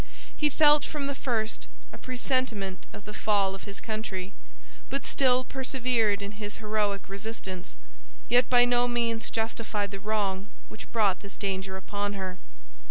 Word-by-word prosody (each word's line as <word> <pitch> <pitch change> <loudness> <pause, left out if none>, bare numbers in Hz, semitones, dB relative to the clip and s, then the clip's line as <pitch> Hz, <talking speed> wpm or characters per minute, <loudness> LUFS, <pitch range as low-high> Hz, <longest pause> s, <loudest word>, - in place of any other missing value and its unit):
He 300 - +3
felt, 295 0 +6
from 295 -2 -3
the 280 - -1
first, 230 -5 -1 0.3
a - - -7
presentiment 250 -7 -1
of 205 - -10
the 210 - -7
fall 200 -3 +2
of 195 - -8
his 200 -1 -6
country, 210 -3 -4 0.6
but 275 - -2
still 255 -2 +4
persevered 245 -6 +1
in 200 - -4
his 205 0 -3
heroic 210 -2 0
resistance, 195 - -6 0.5
yet 245 +1 +5
by 245 -1 +7
no 245 0 +3
means 235 -2 +1
justified 220 -2 -1
the 195 - -5
wrong 200 -2 0 0.2
which - - -10
brought 205 -5 +3
this 200 -1 -10
danger 190 -1 -2
upon 205 +1 -2
her. 190 -2 -4
215 Hz, 155 wpm, -29 LUFS, 200-245 Hz, 0.6 s, by